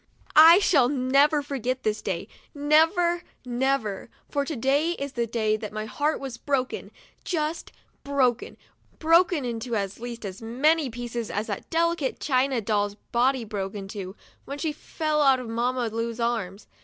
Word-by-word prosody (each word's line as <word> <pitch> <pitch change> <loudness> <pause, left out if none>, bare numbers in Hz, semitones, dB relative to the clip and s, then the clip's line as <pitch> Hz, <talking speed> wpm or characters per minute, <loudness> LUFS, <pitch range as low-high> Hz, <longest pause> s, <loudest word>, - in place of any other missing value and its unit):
I 325 +3 +10
shall 275 -10 +4
never 285 +3 +3
forget 260 -2 -3
this 215 0 -1
day, 185 -4 -3 0.3
never, 325 +4 +3 0.2
never, 245 -5 -1 0.2
for 285 - -1
to 310 - -4
day 280 +7 +1
is 280 -4 -5
the 235 -1 -1
day 215 -1 0
that 215 -1 -7
my 215 0 -4
heart 295 +7 -1
was 265 -4 -7
broken, 265 -2 -2 0.3
just 320 -1 -2 0.3
broken, 260 -4 0 0.2
— - - -35
broken 335 -2 +3
into 235 0 -3
at 200 -1 -3
least 235 -1 -7
as 190 +1 -7
many 275 +6 +2
pieces 235 -1 -5
as 210 +2 -2
that 205 -3 -6
delicate 335 -4 0
china 260 -2 +1
doll*s 205 -1 0 0.2
body 250 +1 +2
broke 200 -2 -4
into, 195 -1 -6 0.3
when 280 - -6
she 310 +1 -1
fell 305 0 -2
out 270 -2 +5
of 250 - -7
Mamma 240 +1 -1
Lu*s 230 +1 -3
arms. 220 -5 -2
255 Hz, 160 wpm, -26 LUFS, 225-290 Hz, 0.3 s, I